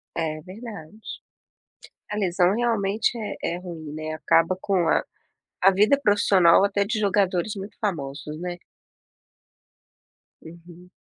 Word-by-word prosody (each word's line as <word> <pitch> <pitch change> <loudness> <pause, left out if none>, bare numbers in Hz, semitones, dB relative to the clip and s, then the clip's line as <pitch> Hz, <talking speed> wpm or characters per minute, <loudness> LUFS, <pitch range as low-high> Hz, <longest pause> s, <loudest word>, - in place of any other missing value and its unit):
É 155 -2 -2
verdade. 200 -1 -10 1.1
A 210 - -3
lesão 185 -2 +2
realmente 225 -1 0
é 215 -2 -5 0.2
é - - -5
ruim, 165 -4 -8
né, 155 0 -5
acaba 165 +3 +2
com 185 -4 0
a - - +2 0.6
a 195 - +7
vida 210 +8 +4
profissional 195 -6 +4
até 200 0 +1
de 220 +2 -2
jogadores 200 -1 +1
muito 195 +2 -8
famosos, 150 -6 -4
né. 175 0 -4 1.9
Uhum. 170 +2 -14
185 Hz, 120 wpm, -24 LUFS, 165-205 Hz, 1.9 s, a